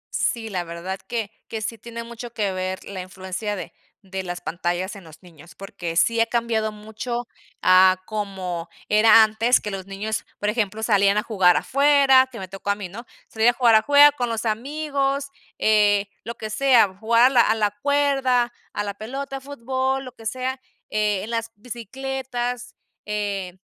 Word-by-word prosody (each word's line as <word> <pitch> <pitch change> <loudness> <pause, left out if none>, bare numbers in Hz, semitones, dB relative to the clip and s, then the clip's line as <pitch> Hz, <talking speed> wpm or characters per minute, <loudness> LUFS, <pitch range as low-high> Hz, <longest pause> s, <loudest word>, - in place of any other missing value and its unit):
Sí, 225 -2 -1
la 180 -3 -2
verdad 170 +3 -6
que 225 -3 -3 0.2
que 220 -1 -5
sí 225 +1 -4
tiene 235 +2 -7
mucho 235 0 -9
que 205 -4 -1
ver 185 0 -3
la 195 -2 -6
influencia 190 +3 -5
de 190 - -7 0.3
de 190 0 -5
las 175 -1 -6
pantallas 175 +3 -3
en 200 - -11
los 160 +3 -15
niños 170 -1 -16
porque 175 -4 -6
sí 230 +6 +3
ha - - +4
cambiado 230 -2 0
mucho 220 +3 -5 0.4
a 185 0 +6
como 190 -5 -4 0.2
era 220 +1 +7
antes 220 +3 +3
que 210 - -5
los 195 -1 -6
niños 210 +3 -3 0.2
por 205 - 0
ejemplo, 215 -1 -1
salían 200 -2 +3
a 210 - +1
jugar 190 -6 +4
afuera, 275 -1 +4
que 235 - -9
me 190 - -6
tocó 195 +2 -7
a 200 - +3
mí, 200 -3 -7
¿no?, 230 +7 -9 0.2
salía 220 +2 +3
a - - -14
jugar 235 -2 +4
afuera 285 +6 +7
con 245 -4 -3
los 230 0 -3
amigos, 275 +4 -1 0.3
eh 205 -2 +3 0.2
lo 235 +1 -6
que 215 -1 -6
sea, 230 -5 +4
jugar 230 +4 +3
a 255 - +7
la 250 -3 +5
a 220 - +3
la 210 -2 +1
cuerda 270 -4 +2 0.2
a 205 - -2
la 200 -1 -4
pelota, 270 +6 -6
fútbol, 265 0 -2
lo 255 - -8
que 225 -2 -8
sea, 255 +2 -3 0.3
eh, 210 -2 0
en 220 - -7
las 230 -1 -2
bicicletas. 245 +1 -5 0.3
Eh, 200 -3 -3
220 Hz, 180 wpm, -23 LUFS, 195-245 Hz, 0.4 s, era